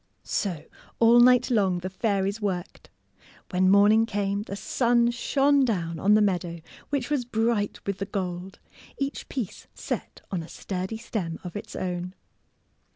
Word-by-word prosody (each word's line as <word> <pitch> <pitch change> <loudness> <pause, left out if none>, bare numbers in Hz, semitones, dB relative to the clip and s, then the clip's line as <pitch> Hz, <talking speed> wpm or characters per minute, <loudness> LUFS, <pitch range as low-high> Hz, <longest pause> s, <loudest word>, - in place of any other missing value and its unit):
" - - -43
So 180 -7 -2 0.3
all 235 +1 +7
night 250 +1 +6
long 195 -6 +2
the 185 - -4
fairies 200 +1 -1
worked. 185 -3 -4 0.6
When 185 +1 +3
morning 210 +3 +5
came 200 -1 -1
the 200 -1 -6
sim 235 +2 +2
shone 275 +3 +2
down 170 -9 -1
on 205 +5 +4
the 215 - +5
meadow 175 -4 -1 0.3
which 280 -1 -2
was 285 -4 +1
bright 225 -3 0
with 200 -1 -3
the 195 - -2
gold, 185 -1 -4 0.4
each 275 0 -4
piece 245 -9 -5
set - - -5
on 180 -3 -1
a 160 - -9
sturdy 190 +3 -4
stem 195 -7 -4
of 180 -2 -7
its 205 - -7
own. 180 0 -4
200 Hz, 155 wpm, -26 LUFS, 185-235 Hz, 0.6 s, all